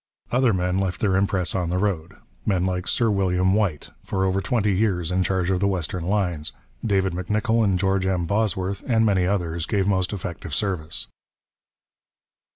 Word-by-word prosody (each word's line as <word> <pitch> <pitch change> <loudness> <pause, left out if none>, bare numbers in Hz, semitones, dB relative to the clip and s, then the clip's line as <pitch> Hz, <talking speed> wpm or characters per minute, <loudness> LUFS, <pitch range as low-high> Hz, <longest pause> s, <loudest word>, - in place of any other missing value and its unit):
Other 125 -1 +3
men 90 -1 0
left 95 -2 -1
their 95 -3 +2
impress 95 -2 +1
on 90 -3 -1
the 90 - 0
road: 90 -5 -1 0.3
men 95 -3 +1
like 90 -1 -2
Sir 115 -2 +2
William 95 -1 +2
Whyte, 100 -9 0
for 95 0 -1
over 95 +1 +1
twenty 105 -3 +1
years 90 -4 +1
in 95 +1 +2
charge 95 0 0
of 95 - +1
the 100 - +2
western 90 -2 -2
lines, 90 -6 -1 0.3
David 95 -4 +1
M'Nicoll, 105 +6 +1
and 95 -3 +2
George 95 0 +1
M. 90 -2 0
Bosworth 100 -1 0
and 115 -3 +3
many 95 -4 +2
others, 85 -4 -1
gave 100 -2 +1
most 95 -2 +1
effective 85 -5 -5
service. 85 -3 -2
95 Hz, 170 wpm, -24 LUFS, 90-100 Hz, 0.3 s, Other